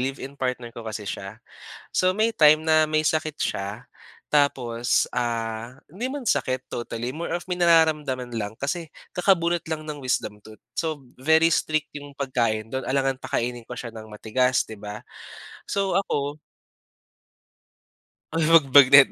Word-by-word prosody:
live-in 135 +1 -4
partner 125 -3 -3
ko 115 - -8
kasi 110 -2 -6
siya. 100 +2 -6 0.5
So 185 0 +2
may 220 +2 0
time 155 0 +7
na 155 0 +4
may 155 0 +1
sakit 155 0 0
siya. 100 +5 -3 0.4
Tapos, 125 -5 +1
ah, 115 -1 -2 0.2
hindi 200 - -4
man 275 -6 -3
sakit 130 -2 0
totally 120 +3 -4
more 170 0 -4
of 175 - -2
may 180 - -1
nararamdaman 155 -7 +3
lang 105 -1 -3
kasi 155 +3 -3 0.2
kakabunot 175 -2 +2
lang 155 -1 -3
ng 145 -3 -6
wisdom 105 -4 -1
tooth. 110 0 -14 0.2
So, 155 -4 -2 0.2
very 160 +4 +4
strict 155 -2 0
'yong 145 0 -9
pagkain 115 -5 -1
do'n 130 0 -3
alangang 135 0 +1
pakainin 120 -2 -3
ko - - -9
siya 120 -1 -6
ng 110 -1 -10
matigas 125 +4 +1
'di 110 - -8
ba? 105 +1 -7 0.7
So 195 -1 0
ako 145 -6 -1 2.0
Uy, 165 - +2
'wag 160 -3 +6
bagnet 140 0 +8
135 Hz, 150 wpm, -24 LUFS, 120-155 Hz, 2.0 s, bagnet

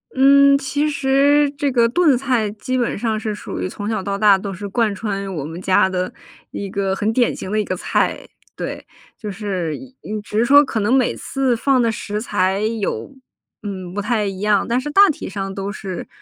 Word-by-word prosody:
嗯， 280 +1 +6
其 285 +2 -1
实 285 +1 +3
这 285 -1 0
个 235 -2 +4
炖 305 -3 +3
菜 250 -5 0
基 255 +4 -3
本 240 -4 -1
上 220 -1 -1
是 215 -1 -3
属 - - -7
于 - - -2
从 205 +3 -5
小 215 -3 -1
到 200 0 -3
大 205 -2 +5
都 195 0 -5
是 200 +3 -6
贯 215 0 0
穿 195 -2 -4
我 145 - -3
们 165 +4 -7
家 190 0 +3
的 185 -1 -2 0.4
一 200 -1 -5
个 195 0 -1
很 210 +3 0
典 240 0 +1
型 190 - -7
的 215 - +1
一 - - +1
个 185 - -3
菜， - - -1 0.3
对， - - -6 0.3
就 210 - -6
是 190 -6 -3 0.3
嗯， 210 0 -4
只 210 - -5
是 235 - +3
说 285 +2 +7
可 230 -5 -3
能 210 +5 +1
每 260 -3 +3
次 265 -3 -1
放 265 0 +2
的 230 -1 +2
食 210 0 -4
材 190 -3 0
有 220 +5 -2 0.5
嗯， 185 -3 -6
不 205 - -2
太 215 0 0
一 195 -1 -4
样， 210 -1 +2
但 240 +2 +1
是 295 +3 -5
大 400 +6 +6
体 300 - -4
上 195 -1 -4
都 195 +1 -4
是， 190 -4 -6
215 Hz, 230 characters per minute, -20 LUFS, 195-260 Hz, 0.5 s, 说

